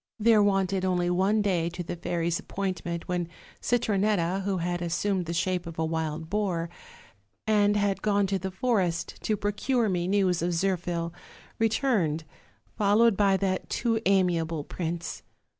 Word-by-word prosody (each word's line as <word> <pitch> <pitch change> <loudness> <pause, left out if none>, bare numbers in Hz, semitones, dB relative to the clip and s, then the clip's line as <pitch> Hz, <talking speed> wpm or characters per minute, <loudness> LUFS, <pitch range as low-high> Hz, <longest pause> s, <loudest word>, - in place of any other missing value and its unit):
"There 220 -1 +5
wanted 195 -2 +2
only 180 -1 +1
one 195 +4 +2
day 175 -4 +1
to 175 +1 -6
the 170 - -5
fairies' 170 0 -1
appoint 190 -2 -3
ment 170 -1 -4
when 175 -2 -1 0.3
Citronett^ 200 -5 +1
who 195 -1 -1
had 175 0 -2
assumed 175 +1 -1
the - - -2
shape 180 0 -1
of 165 - -8
a 160 - 0
wild 160 0 -3
boar, 180 -4 -1 0.7
and 210 -1 +3
had 200 -1 0
gone 205 -1 +2
to 195 0 -1
the 190 +2 -3
forest 190 -4 -1
to 215 - 0
procure 210 +3 0
me 175 -2 0
news 190 -3 +2
of 175 +1 0
Zirphil, 175 -2 -1 0.5
returned, 220 - +1 0.5
followed 210 +2 +4
by 195 -1 +3
that 190 -1 -1
too 225 -2 0
amiable 170 -5 +2
prince. 170 +1 -4
185 Hz, 155 wpm, -27 LUFS, 170-205 Hz, 0.7 s, There